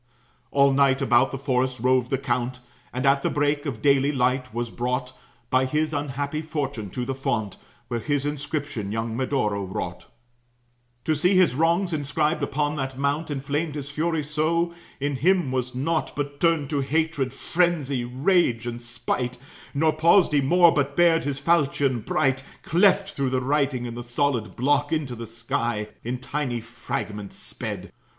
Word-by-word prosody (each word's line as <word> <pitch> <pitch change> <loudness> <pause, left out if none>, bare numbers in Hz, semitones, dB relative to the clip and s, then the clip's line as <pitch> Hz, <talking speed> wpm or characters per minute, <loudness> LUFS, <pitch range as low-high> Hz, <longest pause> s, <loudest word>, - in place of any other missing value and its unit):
All 140 -1 +4
night 135 -1 +4
about 130 -2 +4
the 135 - -5
forest 130 -1 0
roved 130 0 +2
the 135 - +1
count, 125 -1 -2 0.3
And, 130 +2 -2
at 140 0 +4
the - - +1
break 145 +1 0
of 115 -6 -5
daily 140 0 +4
light, 130 -2 0
was 120 0 -3
brought 125 +1 -2 0.4
By 130 0 +4
his 155 +3 0
unhappy 145 +1 -2
fortune 140 -9 -3
to 125 +5 -4
the 135 - -2
fount, 110 -6 -2 0.3
Where 120 - -2
his 145 +2 -1
inscription 145 -7 -3
young 110 +1 -2
Medoro 115 -6 0
wrought. 95 0 -5 1.0
To 160 - +1
see 180 +6 +2
his 185 -7 +5
wrongs 170 +5 +2
inscribed 150 +1 0
upon 150 +1 -1
that 135 -1 -3
mount 140 +4 0
Inflamed 145 +2 -2
his 145 -1 -5
fury 160 +1 0
so, 160 +3 0 0.3
in 140 0 -1
him 175 -2 +2
was 125 -1 -2
naught 155 +5 -1
But 145 0 -4
turned 160 -4 +2
to 145 -2 +1
hatred, 145 -2 0
frenzy, 150 -5 0
rage, 125 -1 +2
and 120 0 -4
spite; 120 +1 -3 0.4
Nor 155 +2 +3
paused 170 +3 +5
he 145 - +4
more, 170 +5 +6
but 140 -1 -1
bared 170 -1 +4
his 140 -2 -1
falchion 140 -5 +2
bright, 135 +4 0 0.2
Cleft 195 +3 +3
through 135 -2 -1
the 130 0 +1
writing; 135 -2 0
and 120 -1 -5
the 120 - -5
solid 120 -2 -1
block, 145 +3 +1
Into 150 -6 -1
the 115 0 -7
sky, 115 -1 -2
in 125 +2 -2
tiny 130 -1 -2
fragments 115 -3 -5
sped. - - -6
140 Hz, 165 wpm, -25 LUFS, 125-150 Hz, 1.0 s, more